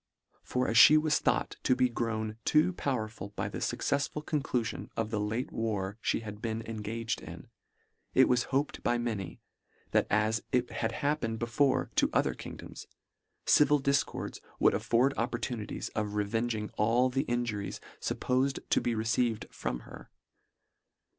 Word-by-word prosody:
For 125 0 -1
as 115 - +1
fhe 155 +7 +9
was 155 -1 +2
thought - - 0
to 130 - +3
be 125 0 +3
grown 110 -2 -2
too 155 +8 +3
power 130 -9 -1
ful 100 -2 -9
by - - -2
the - - -5
fuccefsful 145 +2 -1
conclulion 125 -6 -2
of 110 -1 -1
the 110 - 0
late 110 +5 -2
war 105 -2 -2
fhe - - 0
had 105 -1 -8
been 115 -1 -2
engaged 115 +1 -3
in, - - -10 0.7
it - - +7
was 125 -1 +2
hoped 140 +2 -1
by 120 - +1
many, 110 -7 -4 0.5
that - - +3
as 110 +2 +2
it 125 -1 +1
had 115 - -1
happened 115 -6 0
before 120 +4 +1
to - - +4
other - - +2
kingdoms, - - -9 0.6
civil 150 0 +5
difcords 140 0 -1 0.2
would - - +5
afford 125 +4 +2
opportunities 115 -2 -3
of 105 -1 -3
revenging 110 +1 -1
all 120 +4 +3
the 135 +1 +1
injuries 120 -4 -2 0.2
fuppofed 130 +2 0
to - - +3
be 120 - 0
received 110 0 0
from 60 -1 -4
her. - - -12
115 Hz, 155 wpm, -30 LUFS, 110-130 Hz, 0.7 s, fhe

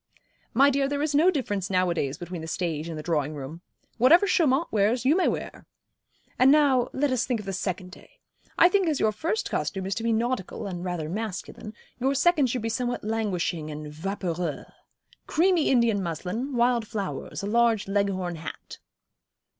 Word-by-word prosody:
'My 275 +4 +6
dear, 275 0 +1
there 285 +1 -1
is 305 -1 -1
no 315 +6 +5
difference 205 - -2
nowadays 175 -7 0
between 175 -1 -6
the 160 - -7
stage 160 -1 -3
and 160 - -5
the 155 - -6
drawing 155 -2 -1
room. 145 +4 -8 0.4
Whatever 325 - +6
Chaumont 325 -5 +2
wears 220 +4 +1
you 290 +5 +5
may 370 - +2
wear. - - -4 0.7
And 260 +2 +7
now 275 -5 +4
let 280 +1 0
us 255 -1 0
think 245 -4 0
of 210 - -8
the 195 - -4
second 185 0 -3
day. - - -16 0.4
I - - +8
think 380 0 +2
as 305 -3 0
your 215 - +3
first 330 - -2
costume 190 -2 -2
is 195 - -1
to 225 - -4
be 230 0 0
nautical, 225 -2 -2
and 180 -3 -5
rather 175 -4 -3
masculine, 210 +2 -5 0.2
your 270 +3 +1
second 305 -2 +3
should 245 -1 -2
be - - -1
somewhat 245 +2 -2
languishing 190 -7 -2
and 150 0 -7
vaporeux. 175 -1 -3 0.6
Creamy 345 0 +2
Indian 235 -5 +3
muslin, 190 - -4
wild 240 -2 +2
flowers, 205 -3 -5
a - - -2
large 230 -1 +2
Leghorn 195 -3 -1
hat.' 160 - -9
215 Hz, 180 wpm, -26 LUFS, 180-265 Hz, 0.7 s, I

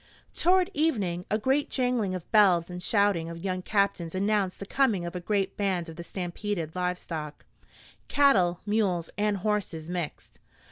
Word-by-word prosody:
Toward 370 +2 +3
evening 205 - 0
a 215 - +2
great 265 +6 +1
jangling 245 -7 0
of 180 - -8
bells 185 -5 +4
and 180 0 -6
shouting 200 -5 +2
of 170 - -7
young 185 +1 -3
captains 190 -4 0
announced 200 -1 0
the 200 - -6
coming 215 -7 +1
of 170 - -6
a - - -2
great 195 +1 -1
band 185 -4 -1
of 165 - -9
the 170 - -7
stampeded 175 -2 -4
livestock 180 -4 -4 0.6
cattle, 190 -12 +3
mules 200 -6 0
and 210 -1 +1
horses 185 -5 -2
mixed. 175 -4 -5
190 Hz, 155 wpm, -28 LUFS, 175-210 Hz, 0.6 s, bells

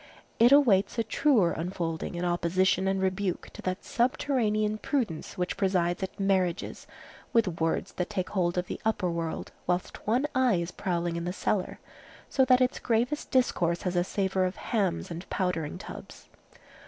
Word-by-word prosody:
It 235 +3 +7
awaits 240 -8 +5
a 230 - +2
truer 220 - +3
unfolding 165 -1 -3
in 175 +1 -2
opposition 180 +2 +2
and 195 0 +1
rebuke 190 -1 -1
to - - -9
that 185 0 -3
subterranean 220 -4 +1
prudence 225 - -2
which 180 0 -2
presides 180 -3 +1
at 190 +1 -5
marriages 190 -2 0 0.5
with 200 -8 +2
words 165 0 0
that 180 - -3
take 190 -4 -2
hold 175 -3 0
of 180 - 0
the - - -6
upper 205 -5 0
world, 165 -1 -4 0.2
whilst 180 +2 -2
one 245 +6 +2
eye 260 -5 +3
is 170 0 -2
prowling 175 -3 -2
in 170 - -3
the 175 - -1
cellar; 195 -1 -1 0.5
so 265 - +4
that 255 0 +5
its 255 0 +1
gravest 245 +5 0
discourse 175 -10 +1
has 180 -1 -1
a 175 - +3
savor 190 0 0
of 185 +1 -2
hams 195 - -1
and 170 +3 -7
powdering 180 -5 -1
tubs. 185 - -10
190 Hz, 165 wpm, -28 LUFS, 175-220 Hz, 0.5 s, It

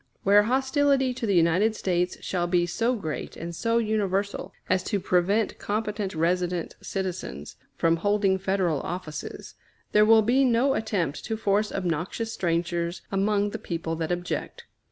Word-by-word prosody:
Where 200 +1 +6
hostility 265 +2 +2
to 240 -2 -4
the 200 - +2
United 180 +6 +3
States 180 -3 0
shall 175 -2 -1
be 175 0 +2
so 230 +8 0
great 160 -9 -5
and 170 +1 -6
so 230 +6 +1
universal 205 -3 -1 0.2
as 185 0 +2
to 205 - 0
prevent 195 +4 +1
competent 210 -2 -2
resident 175 +1 0
citizens 180 - -5 0.2
from 165 0 +3
holding 200 +1 +2
Federal 190 -6 0
offices, 175 -4 -6 0.4
there 210 - +5
will 220 0 +6
be 250 +5 +3
no 255 +2 +3
attempt 185 -10 -2
to 220 -1 -2
force 210 0 +1
obnoxious 185 +5 -2
strangers 170 0 -1
among 205 +1 +1
the - - -5
people 165 -1 -3
that 160 +1 -2
object. 175 0 -3
195 Hz, 150 wpm, -26 LUFS, 175-215 Hz, 0.4 s, Where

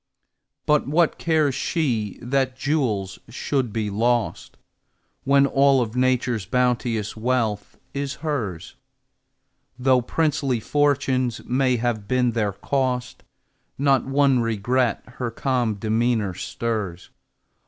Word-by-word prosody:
But 150 -2 +2
what 160 +3 +2
cares 155 -4 +2
she 125 - -1
that 130 0 0
jewels 125 -10 -1
should 130 0 -1
be 105 -1 -2
lost, 120 +3 -1 0.7
When 140 0 +5
all 140 -1 +4
of 115 -1 -2
Nature's 125 -5 +1
bounteous 120 -3 0
wealth 110 -3 -1 0.2
is 140 0 -3
hers? 110 - -3 1.0
Though 130 0 +3
princely 140 -2 0
fortunes 130 -2 0
may 130 0 +2
have 110 -3 -2
been 125 0 +2
their 105 -3 -1
cost, 125 +4 -2 0.6
Not 135 -1 +3
one 135 -1 +3
regret 115 +1 0
her 125 -1 -5
calm 120 -2 0
demeanor 110 -1 0
stirs. 100 -3 -4
125 Hz, 110 wpm, -23 LUFS, 110-135 Hz, 1.0 s, When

